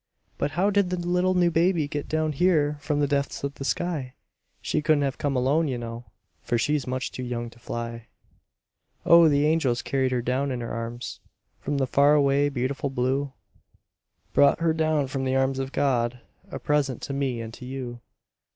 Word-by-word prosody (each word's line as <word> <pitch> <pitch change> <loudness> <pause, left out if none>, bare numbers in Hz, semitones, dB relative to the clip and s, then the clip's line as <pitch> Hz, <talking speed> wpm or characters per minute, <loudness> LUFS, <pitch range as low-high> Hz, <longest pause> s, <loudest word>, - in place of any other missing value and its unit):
But 145 - -1
how 195 +3 +3
did 200 -2 +2
the 180 - -1
little 180 +1 +1
new 175 -1 +3
baby 165 -2 +2
get 145 0 -5
Down 155 0 0
here 150 -2 +2
from 150 0 -1
the 145 - +2
depths 140 -1 -1
of 140 0 -2
the 135 - -8
sky? 145 -4 -2 0.4
She - - -1
couldn't 150 -1 +3
have 135 -1 -2
come 140 -2 -1
alone, 140 +6 +2
you 130 -3 -2
know, 120 0 -7 0.4
For 120 - 0
she's 145 +3 0
much 130 0 -2
too - - -6
young 120 -2 -4
to 120 - -18
fly. 115 -1 -6 1.0
Oh! 170 -1 +7
the 145 0 +3
angels 150 -6 +1
carried 135 -2 0
her 125 -2 0
down 130 +3 0
in 125 - -2
their 120 -1 -5
arms 115 +1 -5 0.4
From 145 +1 -2
the 135 - +2
far 140 +3 +4
away, 140 0 +3
beautiful 140 +2 -2
blue; 135 +2 -1 1.0
Brought 140 - +5
her 165 -1 +2
down 155 -2 +1
from 135 0 -3
the 130 0 0
arms 135 0 +1
of 135 0 -3
God, 125 -3 0 0.3
A - - -5
present 145 -4 0
to 140 - -4
me 135 -3 -1
and 115 -1 -6
to 125 - -10
you. 125 -2 -6
140 Hz, 195 wpm, -25 LUFS, 125-150 Hz, 1.0 s, Oh